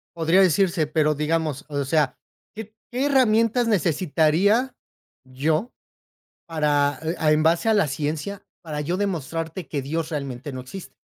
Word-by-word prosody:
Podría 165 +3 +3
decirse, 180 -2 +3
pero, 155 -1 +1
digamos, 150 -1 -1
o 145 -1 -2
sea, 145 -2 +1 0.4
qué 220 0 -8 0.2
¿qué 255 +3 -1
herramientas 235 -3 +3
necesitaría 185 - +2 0.5
yo, 155 - -1 0.8
para, 150 -3 +1
eh, 160 +2 -2 0.2
en 155 - +3
base 165 +6 +2
a - - +4
la 200 -7 +3
ciencia, 155 +8 -4 0.2
para 150 -3 -5
yo 175 +5 -2
demostrarte 165 -3 -3
que 140 -3 -3
Dios, 160 +4 -3
realmente, 140 -2 -5
no 130 - -5
existe? 180 +9 -10
160 Hz, 140 wpm, -23 LUFS, 150-195 Hz, 0.8 s, a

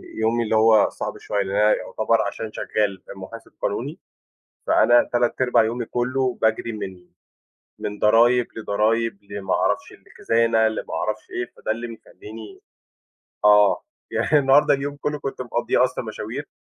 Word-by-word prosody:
يومي 115 +2 +1
اللي 110 0 0
هو 110 -1 +5
صعب - - -6
شوية، 100 -1 -2
لإن 95 +1 -4
أنا 105 +1 +4
يُعتبر 110 0 0
عشان 110 -1 -4
شغَال 100 -3 -2
آآ - - -6
مُحاسب 115 +4 -10
قانوني، - - -3 0.7
فأنا 120 0 +4
3/4 120 0 +2
يومي 115 +1 -2
كلّه 125 +1 -1
باجري 110 +1 +1
من 95 -4 -8 0.7
من 105 0 -5
ضرايب 120 +3 +4
لضرايب 110 +1 0
لما 100 -1 -2
أعرفش - - 0
لخزانة 115 -1 +1
لما 110 - -5
أعرفش 110 0 -3
إيه 120 -1 -4
فده - - -5
اللي 115 +2 -2
بيخلّيني 110 -1 -11 0.8
آه، 105 -1 +5 0.3
يعني 150 - +2
النهارده 140 +1 +4
اليوم 140 +1 -4
كلّه 150 +1 -3
كنت 135 -2 -5
مقضّيه 120 +1 +1
أصلًا 130 -1 -3
مشاوير، 110 +5 -6
115 Hz, 145 wpm, -22 LUFS, 105-120 Hz, 0.8 s, هو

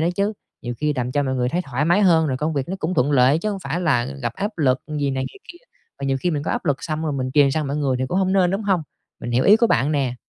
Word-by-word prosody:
đó 160 - +2
chứ, 200 +2 +1 0.3
nhiều 120 0 -4
khi 150 +1 0
làm 125 0 -2
cho 145 - +1
mọi 130 -1 -1
người 125 -1 0
thấy 175 +6 -1
thoải 140 0 -2
mái 175 +5 +3
hơn, 165 -4 +4
rồi 130 -3 -1
công 155 +4 -2
việc 140 0 -2
nó 190 - -3
cũng 180 0 -2
thuận 140 0 +2
lợi 135 +2 +4
chứ 215 +6 -2
hổng 200 - -4
phải 175 - -3
là 145 -9 +2 0.2
gặp 120 -1 -1
áp 205 -1 -4
lực 130 -3 +2 0.2
gì 140 -1 0
này 130 0 -2
gì - - -15
kia, 345 - -17 0.4
và - - -4
nhiều 135 0 +1
khi 180 - 0
mình 150 -3 -2
có - - -3
áp 240 - -2
lực 145 -5 -1
xong 155 -1 -3
rồi 155 -2 -1
mình 130 -2 -2
truyền 145 -2 +5
sang 150 +2 -1
mọi 140 +1 -2
người 140 -4 0
thì 130 - -1
cũng 180 - 0
hông 190 0 +1
nên, 185 -2 +3
đúng 195 +3 -2
hông? 190 -5 +1 0.4
Mình 120 - -5
hiểu 120 +2 +2
ý 205 - +7
của 235 - +3
bạn 140 - +1
nè. 135 -4 0
150 Hz, 325 wpm, -22 LUFS, 130-180 Hz, 0.4 s, ý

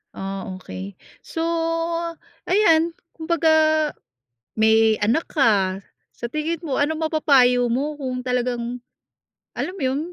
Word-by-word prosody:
Oh, 195 -1 -5
okey. 95 - -8 0.2
So, 325 - -5 1.0
ayan, 335 -4 +3 0.2
kumbaga 315 -2 +2 0.6
may 220 0 +4
anak 235 +11 +1
ka. 200 - +2 0.3
Sa 235 - -5
tingin 305 +3 -2
mo, 285 -6 -2
ano 295 +2 +1
mapapayo 280 -6 +3
mo 290 +5 -1
kung 255 -3 -3
talagang 245 -1 -2 0.8
alam 360 - -3
mo 340 - -4
yun, 260 +2 0
265 Hz, 115 wpm, -22 LUFS, 225-315 Hz, 1.0 s, may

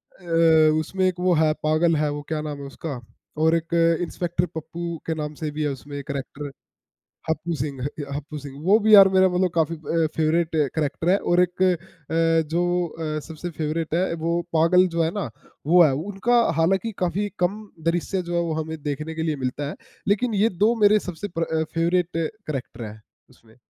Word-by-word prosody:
अ, 165 -3 +4
उसमें 185 +4 -1
एक 180 -1 -2
वो 180 0 +3
है, 155 0 +3
पागल 155 +2 +3
है 150 0 +1
वो 145 0 -4
क्या 155 -1 -2
नाम 150 -2 -5
है 140 - -7
उसका? 140 -1 -6 0.4
और 160 +1 +3
एक 165 +1 -3 0.3
इंस्पेक्टर 175 0 -1
पप्पू 170 +1 -5
के 160 - 0
नाम 150 -1 -4
से 155 - -1
भी 155 +1 -4
है 145 - +1
उसमें 140 +1 -6
कैरेक्टर 140 0 -6 0.8
हप्पू 160 +1 -1
सिंह, 140 -2 -4
ह 145 +1 -4
हप्पू 150 +1 -6
सिंह 140 -1 -9
वो 210 +3 +6
भी 215 -1 +7
यार 195 -1 +10
मेरा 190 0 +6
मतलब 180 0 +1
काफ़ी 165 0 +1
अ, 160 +1 0
फेवरेट 160 +1 +1 0.2
कैरेक्टर 155 +2 -1
है 195 - +5 0.2
और 175 - +5
एक 180 +1 -1
अ, 165 -2 0
जो 170 +2 +1 0.3
अ, 155 -1 -4
सबसे 160 +2 -6
फेवरेट 155 +1 -2
है, 180 0 +1
वो 170 +1 -1
पागल 175 +3 +5
जो 165 - +3
है 160 - +1
ना - - -3 0.4
वो 175 +2 +7
है, 140 - +3
उनका 205 - +1 0.2
हालाँकि 190 +7 +1
काफ़ी 185 +3 0
कम 185 +4 0 0.3
दृश्य 180 +2 -2
जो 175 0 -5
है, 170 - +2
वो 165 -2 -1
हमें 160 +1 -6
देखने 150 +2 -4
के 160 - -3
लिए 155 -2 -1
मिलता 140 +3 -2
है। - - -6 0.3
लेकिन 215 +3 +1
ये 210 +3 +3 0.2
2 230 +2 +4
मेरे 210 +1 +6
सबसे 180 +4 -5
प्र 160 -1 0
फेवरेट 170 +1 +1
कैरेक्टर 155 - -4
हैं 110 0 -9 0.3
उसमें। 115 -2 -22
165 Hz, 195 wpm, -24 LUFS, 155-180 Hz, 0.8 s, यार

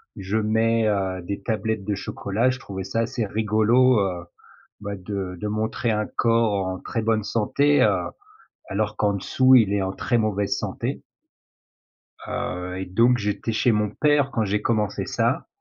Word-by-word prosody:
je 100 +3 -2
mets, 110 +1 +2
heu, 95 -3 -1
des 100 +3 -5
tablettes 110 -1 -2
de 105 0 -1
chocolat, 100 +4 -1
je 130 - -6
trouvais 95 -4 -6
ça 95 +4 -3
assez 115 0 -2
rigolo, 110 +4 +3
heu, 90 -3 -2 0.5
bah, 100 -1 -5
de 95 -1 -5
de 105 - -3
montrer 110 +3 -1
un 105 0 -1
corps 115 -4 +1
en 95 0 -4
très 115 - -3
bonne 110 -1 +1
santé, 140 +8 +2
heu, - - +1 0.6
alors 105 +1 -2
qu'en 105 -1 +1
dessous 130 +7 +3
il 110 -6 +5
est 100 -1 +1
en 95 0 -2
très 120 +4 0
mauvaise 105 -2 0
santé - - -4 1.3
heu 90 +1 -4
et - - -4
donc 115 +7 +3
j'étais 105 +1 -2
chez 115 +2 +2
mon 105 -1 +1
père 145 +4 +2
quand 115 -4 0
j'ai 105 +1 0
commencé 105 -3 -1
ça - - -1
105 Hz, 170 wpm, -24 LUFS, 100-115 Hz, 1.3 s, il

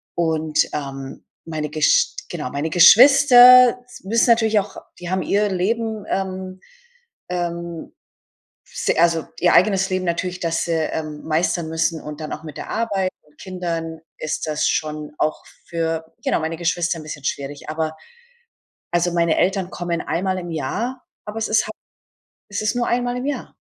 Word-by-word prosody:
Und, 160 -2 +1
ähm, 135 -2 -6 0.2
meine 155 -2 -4
Gesch 155 0 +2
genau, 125 - -5
meine 145 +3 -2
Geschwister 250 - +8
s 250 - -14
müssen 230 +4 +2
natürlich 225 -2 +4
auch 200 0 -6 0.2
die 175 0 -7
haben 185 0 0
ihr 205 +1 +1
Leben, 220 +3 -2
ähm 185 -1 -4 0.7
ähm, 170 -1 -4 0.7
s - - -5
also, 165 -1 +3
ihr 175 - +4
eigenes 190 0 +3
Leben 185 0 -1
natürlich, 180 +1 -2
dass 165 -1 -1
sie 160 -2 0 0.4
meistern 160 +1 0
müssen 160 0 -1
und 150 +1 -8
dann 155 - -5
auch 155 - -7
mit 150 -2 -9
der - - -7
Arbeit 200 -5 -1
und 150 0 -29
Kindern 170 -3 -4 0.2
ist 155 - -3
das 155 0 0
schon 150 -1 -3
auch 155 - -1 0.2
für 165 -1 -2 0.2
genau, - - +1
meine 160 +1 -3
Geschwister 175 0 0
'n - - -10
bisschen 145 -2 -8
schwierig. 140 +1 -4
Aber, 155 0 -3 1.0
also, 175 0 +1
meine 170 -2 +2
Eltern 190 -1 0
kommen 170 -1 -3
einmal 185 +3 -1
im 175 -1 -6
Jahr, 220 - -3 0.2
aber 210 +2 -5
es 220 - -2
ist 215 - +2
ha - - -5 0.8
es 205 0 -3
ist 215 +3 0
nur 245 - 0
einmal 245 0 0
im 250 - -4
Jahr 290 - -4
175 Hz, 160 wpm, -21 LUFS, 160-205 Hz, 1.0 s, Geschwister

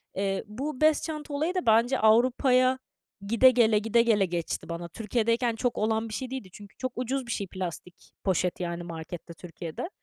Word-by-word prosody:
Eee, 195 0 -1
bu 260 +6 -5
bez 310 -1 +4
çanta 305 -2 -5
olayı 315 +6 0
da 365 - -1
bence 230 +4 +4
Avrupa'ya 255 +3 +4 0.5
gide 230 +4 +6
gele, 225 -3 +4
gide 225 +2 +3
gele 220 -4 +3
geçti 170 -1 -4
bana. 170 0 -5
Türkiye'deyken 230 +3 0
çok 245 +1 -1
olan 220 +1 0
bir - - -7
şey 260 +2 -4
değildi 260 -8 -5
çünkü 205 -1 -13
çok 255 -1 -3
ucuz 255 +1 -2
bir 235 - -4
şey 200 - -2
plastik 180 -1 -7
poşet, 185 -2 0
yani, 175 -1 -3
markette 170 0 -8
Türkiye'de 170 - -7
225 Hz, 180 wpm, -27 LUFS, 185-255 Hz, 0.5 s, gide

